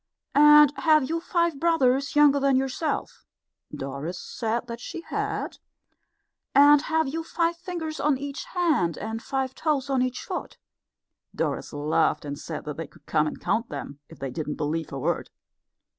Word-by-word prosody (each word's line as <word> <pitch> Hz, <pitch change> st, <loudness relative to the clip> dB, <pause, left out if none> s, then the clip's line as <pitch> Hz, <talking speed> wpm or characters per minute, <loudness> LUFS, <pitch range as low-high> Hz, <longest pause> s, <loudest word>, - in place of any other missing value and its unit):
"And 295 Hz, 0 st, +8 dB
have 310 Hz, -4 st, +4 dB
you 330 Hz, +1 st, 0 dB
five 340 Hz, -4 st, 0 dB
brothers 280 Hz, -5 st, +2 dB
younger 290 Hz, -1 st, +6 dB
than 275 Hz, -1 st, +3 dB
yourself?" 270 Hz, +4 st, -2 dB, 0.5 s
Doris 140 Hz, +6 st, -5 dB
said 235 Hz, +1 st, -3 dB
that 235 Hz, -1 st, -7 dB
she 330 Hz, -, -7 dB
had. -, -, -3 dB, 1.0 s
"And 290 Hz, +1 st, +7 dB
have 320 Hz, -1 st, 0 dB
you 325 Hz, +4 st, -3 dB
five 335 Hz, +1 st, 0 dB
fingers 335 Hz, -3 st, -5 dB
on 295 Hz, -2 st, +2 dB
each 280 Hz, +1 st, -6 dB
hand 315 Hz, -, +1 dB
and 225 Hz, +1 st, -4 dB
five 265 Hz, 0 st, -2 dB
toes 280 Hz, -2 st, -1 dB
on 265 Hz, -2 st, +2 dB
each 255 Hz, 0 st, -2 dB
foot?" -, -, -5 dB, 0.8 s
Doris -, -, -2 dB
laughed 150 Hz, +1 st, +1 dB
and 145 Hz, 0 st, -5 dB
said -, -, -6 dB
that 150 Hz, -1 st, -5 dB
they 165 Hz, -2 st, -5 dB
could -, -, -22 dB
come 155 Hz, -1 st, +2 dB
and -, -, -5 dB
count 230 Hz, +1 st, -1 dB
them 140 Hz, 0 st, -7 dB
if 165 Hz, -, -13 dB
they 135 Hz, -1 st, -5 dB
didn't 150 Hz, +2 st, -4 dB
believe 160 Hz, +1 st, -2 dB
her 140 Hz, -, -6 dB
word. 135 Hz, -, -1 dB
270 Hz, 165 wpm, -26 LUFS, -, 1.0 s, And